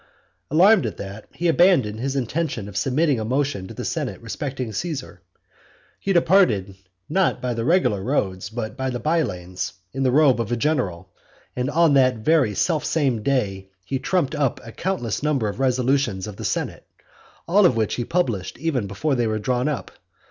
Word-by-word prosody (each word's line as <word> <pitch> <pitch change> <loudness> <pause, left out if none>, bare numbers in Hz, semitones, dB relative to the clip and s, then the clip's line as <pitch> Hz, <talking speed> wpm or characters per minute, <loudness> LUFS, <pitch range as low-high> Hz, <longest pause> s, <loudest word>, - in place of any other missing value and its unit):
Alarmed 185 - +5
at 105 - -6
that, 100 +2 -8
he 175 - -2
abandoned 165 - +3
his 135 +3 -2
intention 135 -4 -2
of 100 - -10
submitting 135 +5 +1
a - - -2
motion 130 -4 -1
to - - -9
the - - -5
senate - - -3
respecting 130 -5 -5
Caesar. 140 - -5 0.8
He 195 - -1
departed 170 - +3 0.3
not 190 +4 +1
by 125 -1 -2
the 115 0 -3
regular 160 - +2
roads, 95 -6 -1
but 110 -1 -5
by 130 0 -2
the 125 - -2
by 160 +7 +1
lanes, 90 - -4 0.2
in 135 - -3
the 130 - +3
robe 135 -2 +4
of 115 - -4
a - - +2
general; 100 - -1 0.5
and 125 +2 -1
on 160 0 +4
that 130 -2 +4
very 130 -3 +2
self 155 - +1
same 140 -8 0
day 100 -7 -1 0.2
he 135 +6 -2
trumped 160 +1 0
up 145 -5 0
a 115 - -8
countless 120 - -2
number 140 -7 +1
of 105 - -5
resolutions 130 -6 +1
of 105 -2 -8
the - - -6
senate; - - -3 0.6
all 200 +5 +4
of 125 - 0
which 110 -2 0
he 120 - -2
published 120 - -1
even 140 -10 -1
before 105 +10 -1
they 120 -3 +1
were 110 0 -1
drawn 125 +4 0
up. 150 -4 -3
130 Hz, 185 wpm, -23 LUFS, 110-155 Hz, 0.8 s, Alarmed